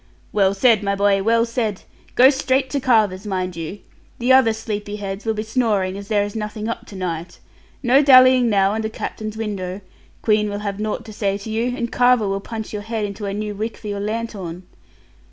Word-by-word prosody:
'Well 195 -1 +2
said, 225 +1 +4
my 200 -1 0
boy, 200 0 +2
well 230 +3 +3
said! 230 -4 -2 0.3
Go 260 +2 +7
straight 265 -1 0
to 280 - 0
Carver's, 215 -6 +2
mind 185 -2 -2
you. 165 +4 -6 0.4
The 245 +2 +3
other 260 -4 +6
sleepy 210 -2 -4
heads 200 0 -6
be 220 -1 -1
snoring, 215 -5 0
as 200 0 -8
there 205 -1 +2
is 205 +1 -6
nothing 215 0 -4
up 230 0 -5
to 200 - -11
night. 175 -2 -4 0.5
No 260 +3 +5
dallying 255 -3 +7
now 195 -2 +3
under 220 +1 -2
Captain's 215 0 -6
window. 195 -4 -4 0.4
Queen 210 -1 +2
will 205 0 -4
have 200 0 -3
nought 215 0 -3
to 215 - -9
say 200 -2 -1
to 205 +2 -8
you; 240 +3 -1
and 235 -1 -3
Carver 245 -3 +3
will 195 0 -1
punch 220 0 -6
your 210 - -3
head 220 0 -3
into 200 0 -5
a 195 - -3
new 210 0 -3
wick 215 +2 -4
for 215 - -7
your 205 0 -3
lanthorn.' 205 -5 -4
215 Hz, 205 wpm, -21 LUFS, 200-230 Hz, 0.5 s, Go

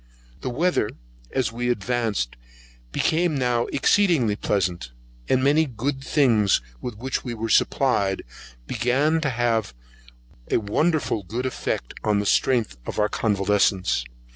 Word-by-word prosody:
The - - -4
weather, 150 -3 +1 0.4
as 125 -5 0
we 120 +1 -2
advanced, 110 - -1 0.6
became 165 - +1
now 125 -2 +1
exceedingly 155 - +2
pleasant, 90 - -1 0.4
and 130 - +3
the - - -2
many 150 +3 +4
good 135 +3 -3
things 115 -9 +3 0.2
with 120 -4 -5
which 130 +4 -3
we 120 -2 -4
were 115 0 -4
supplied, 100 -7 +2 0.4
began 140 - +1
to 145 - 0
have 115 - 0 0.7
a - - +3
wonderful 145 +3 0
good 115 +7 -4
effect 125 - -3
on 105 -1 +2
the 100 - 0
strength 115 - +2
of - - -5
our 105 0 +2
convalescents. 100 - +1
120 Hz, 135 wpm, -24 LUFS, 105-135 Hz, 0.7 s, many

